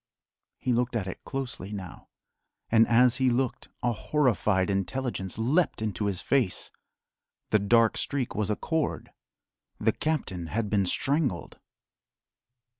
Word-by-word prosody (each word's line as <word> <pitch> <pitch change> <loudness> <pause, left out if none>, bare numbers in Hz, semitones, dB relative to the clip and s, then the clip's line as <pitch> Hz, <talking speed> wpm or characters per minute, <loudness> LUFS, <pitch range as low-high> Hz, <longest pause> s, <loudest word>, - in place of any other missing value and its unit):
He 125 - 0
looked 120 +1 0
at 105 -5 0
it 95 - -7
closely 125 -8 -5
now, 95 -4 -8 0.6
and 115 0 +6
as 125 +1 +5
he 130 -1 +3
looked 125 +1 -1
a 120 - +2
horrified 110 -6 +1
intelligence 100 0 -2
leapt 145 +10 +1
into 105 -2 -2
his 95 -3 -2
face. 130 -10 +1 0.8
The 110 - +5
dark 115 +3 +3
streak 135 -4 -2
was 105 -1 -1
a 105 - +1
cord: 160 +7 -2 0.7
the - - +3
captain 100 - -2
had 105 +3 -2
been 100 -3 +2
strangled! 135 - -1
115 Hz, 130 wpm, -28 LUFS, 100-130 Hz, 0.8 s, and